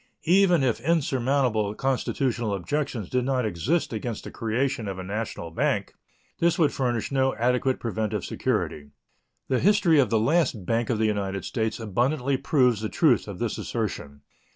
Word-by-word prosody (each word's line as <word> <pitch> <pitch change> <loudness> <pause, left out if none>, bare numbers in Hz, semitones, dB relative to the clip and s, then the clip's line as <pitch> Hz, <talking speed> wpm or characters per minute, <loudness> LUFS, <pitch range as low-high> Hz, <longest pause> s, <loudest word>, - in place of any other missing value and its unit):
Even 180 -3 +4
if 120 -4 +1
insurmountable 130 -7 +1
constitutional 125 -4 -1
objections 115 - -3
did 125 +3 0
not 130 -2 0
exist 115 - -1
against 110 0 -4
the - - -8
creation 115 +1 -1
of 95 -1 -4
a 95 - -5
national 100 -4 -4
bank, 80 - -1 0.5
this 170 +1 +2
would 160 -5 +3
furnish 120 -3 -1
no 135 -1 +1
adequate 125 +2 +1
preventive 110 -3 -2
security. 75 -1 -2 0.6
The 130 - +1
history 185 -6 +4
of 130 -6 +3
the 110 - +2
last 130 - +1
Bank 115 +2 0
of 120 - +1
the 110 - +1
United 100 -3 -2
States 110 0 -2
abundantly 125 +6 0
proves 130 -5 +2
the 110 - -2
truth 140 - +2
of 100 -3 -6
this 120 +1 -2
assertion. 75 -11 -4
120 Hz, 160 wpm, -25 LUFS, 105-135 Hz, 0.6 s, Even